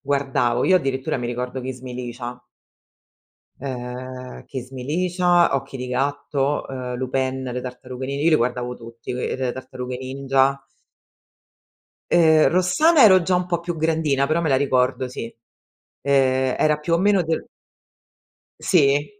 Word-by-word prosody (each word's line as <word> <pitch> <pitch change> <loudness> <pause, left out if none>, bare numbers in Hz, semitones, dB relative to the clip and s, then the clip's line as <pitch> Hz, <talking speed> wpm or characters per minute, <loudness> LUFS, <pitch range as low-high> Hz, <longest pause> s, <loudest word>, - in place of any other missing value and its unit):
guardavo, 135 -4 0
io 185 - +5
addirittura 135 -6 -1
mi 120 -2 -3
ricordo 125 +2 -4
"Kiss 130 0 -6
me 125 -1 -8
Licia". 125 0 -6 1.2
Ehm, 130 -1 -7
"Kiss 130 -1 -7
me 130 -2 -7
Licia", 175 +3 +2
"Occhi 135 0 -5
di 125 0 -5
gatto", 140 +2 -1
ehm, 125 -2 -5
Lupin, 130 +1 -1
"Le 125 - -3
Tartarughe 125 +1 -7
Ni" 140 +1 -3
io 170 - +5
li - - +6
guardavo 125 -1 -1
tutti, 115 -1 -9
ehm, 125 +1 -3
"Le 130 -2 -1
Tartarughe 125 -1 -6
Ninja". 135 +1 0 1.5
Ehm, 160 -2 +5
"Rossana", 280 - +4
ero 190 -4 +7
già 180 +2 +1
un 180 0 0
po' 175 -1 0
più 175 0 -4
grandina, 155 -4 +1
però 155 +3 +1
me 160 - 0
la 135 - +4
ricordo, 130 -1 +1
sì. 115 -2 -7 0.7
Ehm, 130 -2 +2
era 150 -1 +3
più 150 +3 -2
o - - +4
meno 195 -1 +3
del 160 0 -2 1.1
Sì, 145 -5 +3
135 Hz, 150 wpm, -22 LUFS, 125-155 Hz, 1.5 s, ero